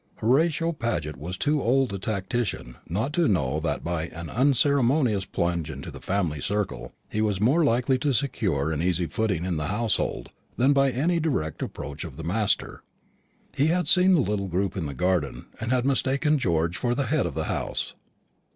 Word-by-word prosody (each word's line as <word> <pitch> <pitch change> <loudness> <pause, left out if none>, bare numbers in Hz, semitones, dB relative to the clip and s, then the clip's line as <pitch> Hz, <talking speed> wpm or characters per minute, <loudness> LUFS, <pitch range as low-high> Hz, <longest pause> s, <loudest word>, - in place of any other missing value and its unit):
Horatio 160 +7 +2
Paget 115 - -2
was 85 +7 -6
too 150 +4 +1
old 130 -2 +2
a 100 - -3
tactician 100 - -3
not 110 - -1
to 170 -2 +3
know 75 -7 +1
that 80 - -2
by 85 -1 -2
an 85 -2 -8
unceremonious 130 - +3
plunge 85 -3 -1
into 70 -2 -7
the - - -10
family 90 -7 -1
circle 100 -11 -2 0.2
he 110 - 0
was 105 -3 0
more 135 - +3
likely 130 -1 +2
to 145 +2 +1
secure 95 - 0
an 80 -1 -1
easy 90 0 +1
footing 95 -2 -1
in 90 -3 -1
the 75 -1 -2
household 110 +1 -1 0.3
than 135 +4 +4
by 135 -1 +4
any 160 +7 +1
direct 130 - -1
approach 75 +3 -5
of 75 -5 -8
the 80 - -6
master. 100 +5 0 0.7
He 145 - +3
had 175 0 +1
seen 185 0 +6
the 160 - +4
little 105 -4 -1
group 95 +2 -1
in 85 -6 -2
the 70 - -6
garden, 90 -2 0
and 110 - -3
had 125 -1 +2
mistaken 140 +2 +2
George 85 -4 0
for 120 0 0
the 140 +1 0
head - - +1
of - - -6
the - - -1
house. - - -3
105 Hz, 190 wpm, -26 LUFS, 85-135 Hz, 0.7 s, seen